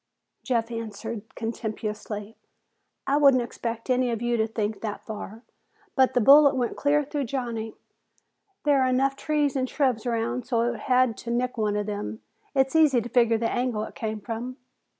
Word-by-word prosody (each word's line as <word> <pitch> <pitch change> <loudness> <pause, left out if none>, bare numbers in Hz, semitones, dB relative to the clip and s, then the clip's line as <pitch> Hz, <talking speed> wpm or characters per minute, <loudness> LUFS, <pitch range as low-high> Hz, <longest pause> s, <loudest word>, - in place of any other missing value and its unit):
Jeff 235 -2 -1
answered 225 -1 -5
contemptuously, 215 -2 -5 0.7
"I 280 - +2
wouldn't 275 -4 +5
expect 230 -1 -5
any 255 -1 +2
of 230 -2 -1
you 240 0 0
to 220 -1 +1
think 220 -1 -3
that 215 -2 -5
far, 220 +1 -7 0.5
but 260 -1 +3
the - - +5
bullet 280 +4 +7
went 245 -2 -1
clear 295 +1 +2
through 285 0 -3
Johnny. 235 -3 -4 0.9
There 285 -2 +4
are 260 - +3
enough 265 +2 +2
trees 295 -1 0
and 260 -1 0
shrubs 255 -5 0
around 235 +1 -1
so 235 -2 +1
that 240 - 0
it 230 - -8
had 255 -2 +2
to 235 - -8
nick 245 +1 0
one 210 -3 0
of 210 0 -1
them. 210 +1 -5 0.3
It's 265 +2 +2
easy 300 -6 +5
to 235 +1 -5
figure 235 -2 +3
the 230 0 -1
angle 245 -4 -1
it - - -7
came 220 -1 -4
from." 235 +4 -5
240 Hz, 180 wpm, -26 LUFS, 225-260 Hz, 0.9 s, bullet